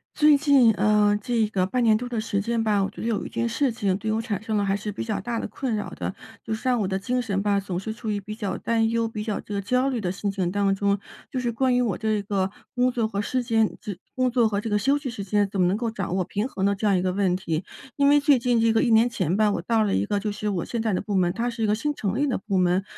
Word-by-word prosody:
最 300 Hz, -1 st, +6 dB
近， 275 Hz, -6 st, +5 dB
呃， 210 Hz, 0 st, +3 dB
这 225 Hz, -1 st, +1 dB
个 190 Hz, -3 st, 0 dB
半 250 Hz, +6 st, -1 dB
年 220 Hz, -2 st, +5 dB
多 245 Hz, +2 st, -3 dB
的 235 Hz, -, -2 dB
时 210 Hz, -2 st, -1 dB
间 230 Hz, +2 st, -1 dB
吧， 210 Hz, -3 st, +2 dB
我 195 Hz, -, -1 dB
觉 -, -, -13 dB
得 -, -, -2 dB
有 225 Hz, -3 st, -1 dB
一 -, -, -6 dB
件 230 Hz, -, -1 dB
事 255 Hz, +3 st, +1 dB
情， 200 Hz, -5 st, 0 dB
对 215 Hz, +2 st, -3 dB
我 220 Hz, +1 st, 0 dB
产 215 Hz, -4 st, -3 dB
生 220 Hz, -1 st, -1 dB
了 205 Hz, -, +1 dB
还 195 Hz, 0 st, +1 dB
是 210 Hz, +1 st, -4 dB
比 205 Hz, -, -5 dB
较 220 Hz, -2 st, -2 dB
大 235 Hz, -1 st, -3 dB
的 -, -, -3 dB
困 260 Hz, -4 st, -3 dB
扰 210 Hz, -, -4 dB
的。 -, -, -4 dB, 0.3 s
就 220 Hz, -, -3 dB
是 220 Hz, +4 st, -4 dB
让 245 Hz, -3 st, +2 dB
我 -, -, 0 dB
的 190 Hz, 0 st, -1 dB
精 250 Hz, +5 st, -1 dB
神 200 Hz, -5 st, -1 dB
吧， 205 Hz, 0 st, +1 dB
总 190 Hz, -3 st, -4 dB
是 220 Hz, +3 st, -5 dB
处 220 Hz, 0 st, -4 dB
于 205 Hz, -, -1 dB
比 210 Hz, +2 st, -7 dB
较 205 Hz, -4 st, -3 dB
担 225 Hz, -1 st, +1 dB
忧、 230 Hz, 0 st, 0 dB
比 215 Hz, -2 st, -5 dB
较 215 Hz, -2 st, -2 dB
这 210 Hz, -, -8 dB
个 200 Hz, -, -1 dB
焦 250 Hz, +6 st, +1 dB
虑 255 Hz, -4 st, -1 dB
的 180 Hz, -3 st, -1 dB
心 200 Hz, +2 st, -3 dB
情 190 Hz, -3 st, -1 dB
当 200 Hz, 0 st, +1 dB
中， 200 Hz, 0 st, +1 dB, 0.3 s
就 260 Hz, -, -2 dB
是 240 Hz, -1 st, -1 dB
关 260 Hz, +2 st, +2 dB
于 250 Hz, -, +3 dB
我 215 Hz, -7 st, 0 dB
这 215 Hz, -1 st, 0 dB
个 195 Hz, -1 st, -1 dB, 0.2 s
工 250 Hz, 0 st, +3 dB
作 235 Hz, -3 st, 0 dB
和 200 Hz, -2 st, -2 dB
时 255 Hz, +5 st, -1 dB
间 225 Hz, -2 st, +1 dB
这 205 Hz, -, -6 dB, 0.2 s
工 255 Hz, 0 st, +2 dB
作 240 Hz, -2 st, +3 dB
和 200 Hz, -1 st, -1 dB
这 225 Hz, -, -4 dB
个 210 Hz, -, +2 dB
休 275 Hz, +7 st, +2 dB
息 285 Hz, -2 st, -5 dB
时 225 Hz, -4 st, -5 dB
间， 205 Hz, +1 st, +1 dB
怎 195 Hz, -2 st, -1 dB
么 180 Hz, -, +4 dB
能 190 Hz, +3 st, +1 dB
够 235 Hz, 0 st, -1 dB
掌 195 Hz, -5 st, -4 dB
握 185 Hz, -1 st, 0 dB
平 205 Hz, +4 st, -2 dB
衡 195 Hz, -6 st, -2 dB
的 200 Hz, 0 st, +2 dB
这 205 Hz, -, -4 dB
样 200 Hz, -2 st, +4 dB
一 -, -, 0 dB
个 185 Hz, 0 st, 0 dB
问 190 Hz, -2 st, +1 dB
题。 165 Hz, -2 st, -2 dB, 0.3 s
因 280 Hz, 0 st, +4 dB
为 290 Hz, 0 st, +6 dB
最 285 Hz, -1 st, +4 dB
近 240 Hz, -1 st, +2 dB
这 225 Hz, 0 st, +3 dB
个 225 Hz, -, +3 dB
1 245 Hz, -, +2 dB
年 225 Hz, +2 st, +5 dB
前 185 Hz, -5 st, -1 dB
吧， 215 Hz, -1 st, +4 dB
我 175 Hz, -, -2 dB
到 220 Hz, +5 st, +1 dB
了 210 Hz, -, +1 dB
一 95 Hz, -, +1 dB
个 205 Hz, -, 0 dB
就 210 Hz, +1 st, -2 dB
是 210 Hz, 0 st, -3 dB
我 185 Hz, -4 st, -2 dB
现 235 Hz, -, -3 dB
在 220 Hz, -1 st, 0 dB
的 185 Hz, -, 0 dB
部 205 Hz, 0 st, -3 dB
门， 180 Hz, -2 st, +3 dB
它 235 Hz, +6 st, -2 dB
是 230 Hz, -1 st, -4 dB
一 -, -, +3 dB
个 210 Hz, -, +2 dB
新 295 Hz, +7 st, -2 dB
成 205 Hz, -2 st, -2 dB
立 290 Hz, +2 st, +1 dB
的 260 Hz, -, 0 dB
部 195 Hz, -1 st, -2 dB
门。 180 Hz, +1 st, +2 dB
215 Hz, 340 characters per minute, -25 LUFS, 200-235 Hz, 0.3 s, 最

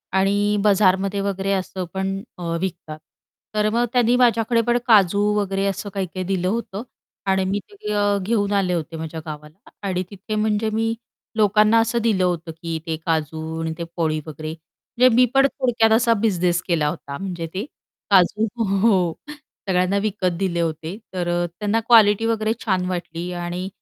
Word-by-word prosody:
आणि 205 Hz, +2 st, +2 dB
बाजारमध्ये 195 Hz, -1 st, +3 dB
वगैरे 195 Hz, 0 st, -1 dB
असं 185 Hz, -1 st, -3 dB
पण 195 Hz, 0 st, -2 dB, 0.2 s
अ, 170 Hz, -1 st, -3 dB
विकतात 165 Hz, -4 st, -5 dB, 0.6 s
तर 210 Hz, 0 st, +2 dB
मग 240 Hz, +1 st, +2 dB
त्यांनी 245 Hz, 0 st, +3 dB
माझ्याकडे 230 Hz, -1 st, +3 dB
पण 240 Hz, +1 st, +1 dB
काजू 200 Hz, -3 st, +5 dB
वगैरे 195 Hz, -1 st, 0 dB
असं 200 Hz, +1 st, -2 dB
काही-काही 185 Hz, -1 st, -3 dB
दिलं 185 Hz, -1 st, -1 dB
होतं 210 Hz, 0 st, -3 dB, 0.5 s
आणि 190 Hz, 0 st, +2 dB
मी 200 Hz, +2 st, 0 dB
ते 410 Hz, -, -16 dB
घे 210 Hz, -, -4 dB, 0.3 s
घेऊन 205 Hz, -1 st, 0 dB
आले 190 Hz, -3 st, +1 dB
होते 165 Hz, -1 st, -3 dB
माझ्या 160 Hz, 0 st, -5 dB
गावाला 150 Hz, -, -10 dB, 0.2 s
आणि 185 Hz, -1 st, -1 dB
तिथे 205 Hz, +2 st, -6 dB
म्हणजे 215 Hz, 0 st, +1 dB
मी 225 Hz, +1 st, 0 dB, 0.4 s
लोकांना 215 Hz, +2 st, +4 dB
असं 230 Hz, +1 st, +1 dB
दिलं 210 Hz, -5 st, +2 dB
होतं, 170 Hz, -2 st, -1 dB
की 165 Hz, 0 st, -5 dB
ते 160 Hz, -1 st, -2 dB
काजू 160 Hz, 0 st, -2 dB
आणि 160 Hz, 0 st, -2 dB
ते 170 Hz, -, -4 dB
पोळी 155 Hz, -2 st, 0 dB
वगैरे 155 Hz, 0 st, -7 dB
म्हणजे 235 Hz, +9 st, 0 dB
मी 250 Hz, -, +6 dB
पण 270 Hz, 0 st, +5 dB
थोडक्यात 240 Hz, -5 st, +1 dB
असा 230 Hz, 0 st, +4 dB
बिझनेस 180 Hz, -5 st, +1 dB
केला 160 Hz, -4 st, +1 dB
होता 140 Hz, -3 st, -6 dB
म्हणजे 175 Hz, -3 st, -5 dB
ते 195 Hz, +6 st, -3 dB, 0.5 s
काजू 200 Hz, +3 st, +4 dB, 0.2 s
हो, 195 Hz, -4 st, +2 dB, 0.2 s
सगळ्यांना 195 Hz, -10 st, -2 dB
विकत 185 Hz, -5 st, -1 dB
दिले 180 Hz, -3 st, 0 dB
होते, 160 Hz, +3 st, -3 dB, 0.2 s
तर 175 Hz, -1 st, -2 dB, 0.2 s
अ, -, -, 0 dB
त्यांना 210 Hz, +2 st, +1 dB
क्वालिटी 220 Hz, -2 st, +6 dB
वगैरे 220 Hz, -1 st, +1 dB
छान 185 Hz, -3 st, +1 dB
वाटली 175 Hz, -1 st, -4 dB
आणि 175 Hz, +1 st, -4 dB
195 Hz, 165 wpm, -22 LUFS, 175-215 Hz, 0.6 s, मी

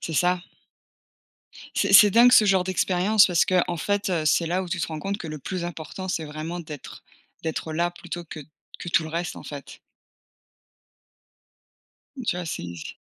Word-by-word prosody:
C'est 165 Hz, -, -5 dB
ça. 180 Hz, +3 st, +2 dB, 1.4 s
C'est -, -, +1 dB
c'est 205 Hz, -1 st, +9 dB
dingue, 240 Hz, +3 st, +7 dB
ce 225 Hz, -, +7 dB
genre 195 Hz, -2 st, +3 dB
d'expérience 185 Hz, +3 st, +3 dB
parce 175 Hz, -3 st, +3 dB
qu'en 180 Hz, -1 st, +1 dB
fait, 205 Hz, +5 st, -1 dB
heu, 170 Hz, -4 st, -1 dB
c'est 165 Hz, +2 st, +2 dB
là 180 Hz, +3 st, 0 dB
où 185 Hz, -, -7 dB
tu 180 Hz, +1 st, -3 dB
te -, -, -1 dB
rends 155 Hz, -1 st, -6 dB
compte 200 Hz, +4 st, -3 dB
que 175 Hz, -, -7 dB
le 155 Hz, -1 st, -6 dB
plus 180 Hz, +3 st, -4 dB
important, 175 Hz, +2 st, -6 dB
c'est 165 Hz, -3 st, -2 dB
vraiment 155 Hz, +3 st, -6 dB
d'être 155 Hz, -4 st, -10 dB, 0.4 s
d'être 160 Hz, 0 st, -4 dB
là 170 Hz, +2 st, 0 dB
plutôt 175 Hz, 0 st, -8 dB
que 160 Hz, -, -9 dB, 0.4 s
que -, -, -7 dB
tout 170 Hz, -, +3 dB
le 160 Hz, -, -6 dB
reste, 170 Hz, +2 st, -3 dB
en -, -, -9 dB
fait. 145 Hz, -2 st, -9 dB, 2.4 s
Tu 225 Hz, -, -1 dB
vois 180 Hz, -, -4 dB
c'est 150 Hz, -, -4 dB
c -, -, -8 dB
175 Hz, 185 wpm, -24 LUFS, 160-185 Hz, 2.4 s, c'est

